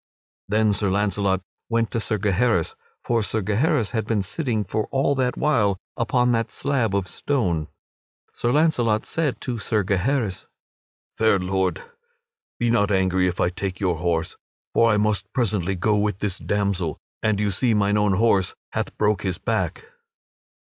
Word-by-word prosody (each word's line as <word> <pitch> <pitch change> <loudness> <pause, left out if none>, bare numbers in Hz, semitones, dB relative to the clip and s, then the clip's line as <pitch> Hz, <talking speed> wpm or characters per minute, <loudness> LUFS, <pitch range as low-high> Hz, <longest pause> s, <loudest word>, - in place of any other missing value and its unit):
Then 105 0 +3
Sir 100 0 0
Launcelot 100 -1 +1 0.3
went 115 -1 +1
to 115 - -1
Sir 110 -1 -1
Gaheris 105 - +1 0.3
for 120 -2 +1
Sir 110 0 -2
Gaheris 110 +2 +1
had 110 -3 -2
been 110 -3 +1
sitting 115 - -1
for 105 +3 -2
all 135 +1 +1
that 130 -2 0
while 110 -10 +2 0.2
upon 125 +2 +2
that 115 -1 0
slab 130 -8 0
of 100 -2 0
stone. 90 - -1 0.7
Sir 120 - -1
Launcelot 125 -8 +2
said 150 -5 -1
to 120 -3 -3
Sir 105 0 0
Gaheris: 100 +2 -1 0.7
"Fair 110 -2 +4
Lord, 95 0 -1 0.7
be 120 -1 +1
not 105 -3 +2
angry 95 -2 +2
if 90 - -3
I 85 - +3
take 95 0 -4
your 90 -4 0
horse, 80 -1 -1 0.4
for 115 -1 +4
I 105 - +3
must 105 -1 0
presently 100 -6 0
go 105 +4 +1
with 105 -2 0
this 100 -2 -3
damsel, 100 -5 -1 0.2
and 110 -2 +1
you 105 -1 +1
see 115 +4 +1
mine 100 0 +2
own 105 -1 +3
horse 100 -2 +2 0.2
hath - - -3
broke 105 -2 +2
his 95 -3 -2
back." 115 - -2
105 Hz, 165 wpm, -23 LUFS, 95-115 Hz, 0.7 s, Fair